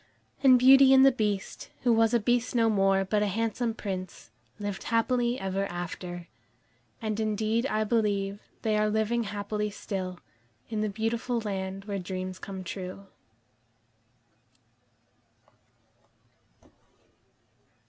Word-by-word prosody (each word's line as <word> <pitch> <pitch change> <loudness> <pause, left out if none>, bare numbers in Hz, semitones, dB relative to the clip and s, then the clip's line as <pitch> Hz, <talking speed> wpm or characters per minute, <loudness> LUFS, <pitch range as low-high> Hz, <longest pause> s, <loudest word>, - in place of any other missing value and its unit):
And 260 -2 +7
Beauty 265 +1 +7
and 265 0 +7
the 270 - +7
Beast, 210 -5 -3
who 240 -2 +4
was 225 0 +4
a 240 - +3
Beast 240 +3 0
no 225 -1 +3
more, 195 -1 +3
but 210 +2 +1
a 210 - +2
handsome 225 +3 -1
Prince, 185 - -6 0.3
lived 205 -2 -5
happily 240 +1 +1
ever 195 +1 -2
after. 175 0 -6 0.8
And 215 -1 -2
indeed 220 +3 0
I 215 -4 0
believe 205 -3 0 0.2
they 215 -2 +1
are 215 0 +2
living 220 +2 0
happily 210 +1 -3
still, 185 -3 -5 0.5
in 215 -1 -1
the 215 - 0
beautiful 225 +3 -1
land 195 -2 -4
where 200 -2 -3
dreams 185 0 -5
come 190 -1 -7
true. 185 +2 -7
210 Hz, 120 wpm, -28 LUFS, 195-230 Hz, 0.8 s, And